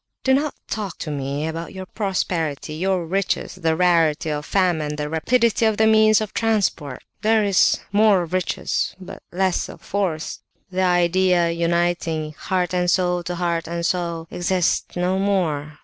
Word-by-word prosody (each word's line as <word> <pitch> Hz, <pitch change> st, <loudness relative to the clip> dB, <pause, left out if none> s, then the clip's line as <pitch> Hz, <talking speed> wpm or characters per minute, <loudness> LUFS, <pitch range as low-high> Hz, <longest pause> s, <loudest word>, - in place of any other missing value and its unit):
Don't 275 Hz, +3 st, +2 dB, 0.2 s
talk 205 Hz, -5 st, -4 dB
to 155 Hz, -, -5 dB
me 140 Hz, +1 st, -3 dB
about 165 Hz, +3 st, -5 dB
your 190 Hz, 0 st, -6 dB
prosperity, 170 Hz, -7 st, -2 dB
your 185 Hz, +2 st, -1 dB
riches, 195 Hz, +3 st, -1 dB
the 165 Hz, -3 st, 0 dB
rarity 165 Hz, -3 st, +2 dB
of 150 Hz, +1 st, -4 dB
famine, 165 Hz, -6 st, +1 dB
the 150 Hz, 0 st, -3 dB
rapidity 230 Hz, +10 st, +1 dB
of 215 Hz, -2 st, 0 dB
the 220 Hz, -, +4 dB
means 215 Hz, 0 st, +5 dB
of 215 Hz, -, -4 dB
transport! 200 Hz, -, -1 dB, 0.2 s
There 220 Hz, 0 st, +3 dB
is 200 Hz, -3 st, +3 dB
more 205 Hz, -3 st, +4 dB
of 170 Hz, +1 st, -9 dB
riches, 185 Hz, 0 st, -1 dB
but 185 Hz, -, -10 dB
less 185 Hz, 0 st, 0 dB
of -, -, -11 dB
force. 185 Hz, -6 st, -3 dB, 0.3 s
The 185 Hz, +1 st, -1 dB
idea 180 Hz, -1 st, +3 dB
uniting 170 Hz, -2 st, -1 dB
heart 180 Hz, +3 st, -2 dB
and 180 Hz, -1 st, +1 dB
soul 180 Hz, 0 st, +2 dB
to 175 Hz, +1 st, -4 dB
heart 170 Hz, -1 st, -1 dB
and 170 Hz, 0 st, -3 dB
soul 170 Hz, -2 st, -2 dB
exists 180 Hz, 0 st, 0 dB
no 180 Hz, +2 st, 0 dB
more. 160 Hz, -7 st, -1 dB
180 Hz, 160 wpm, -22 LUFS, 165-195 Hz, 0.3 s, means